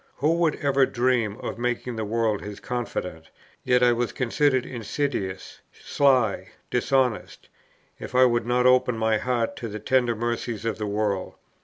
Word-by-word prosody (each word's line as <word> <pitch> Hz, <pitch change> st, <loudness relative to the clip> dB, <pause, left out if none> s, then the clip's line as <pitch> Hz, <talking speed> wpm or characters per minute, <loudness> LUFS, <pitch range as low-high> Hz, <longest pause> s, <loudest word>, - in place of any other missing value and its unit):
Who 150 Hz, +5 st, +1 dB
would 165 Hz, -3 st, +2 dB
ever 140 Hz, -2 st, +2 dB
dream 120 Hz, -4 st, 0 dB
of -, -, -5 dB
making 120 Hz, 0 st, -2 dB
the 110 Hz, -, -3 dB
world 110 Hz, -1 st, 0 dB
his 105 Hz, 0 st, -8 dB
confidant? 90 Hz, -9 st, -5 dB, 0.3 s
yet 125 Hz, -1 st, +3 dB
I 120 Hz, -, +6 dB
was 120 Hz, 0 st, -1 dB
considered 130 Hz, 0 st, +1 dB
insidious, 120 Hz, -5 st, -4 dB
sly, 130 Hz, -8 st, +1 dB, 0.2 s
dishonest, 125 Hz, -2 st, 0 dB, 0.5 s
if -, -, -8 dB
I 130 Hz, 0 st, +7 dB
would 120 Hz, -1 st, +1 dB
not 125 Hz, +1 st, +2 dB
open 125 Hz, -2 st, +4 dB
my 110 Hz, -1 st, +1 dB
heart 120 Hz, -1 st, -1 dB
to 115 Hz, -, -5 dB
the 105 Hz, -1 st, -6 dB
tender 120 Hz, +1 st, +1 dB
mercies 120 Hz, -1 st, -3 dB
of 115 Hz, -1 st, -2 dB
the 105 Hz, -, -2 dB
world. 100 Hz, -2 st, -2 dB
120 Hz, 160 wpm, -25 LUFS, 110-130 Hz, 0.5 s, I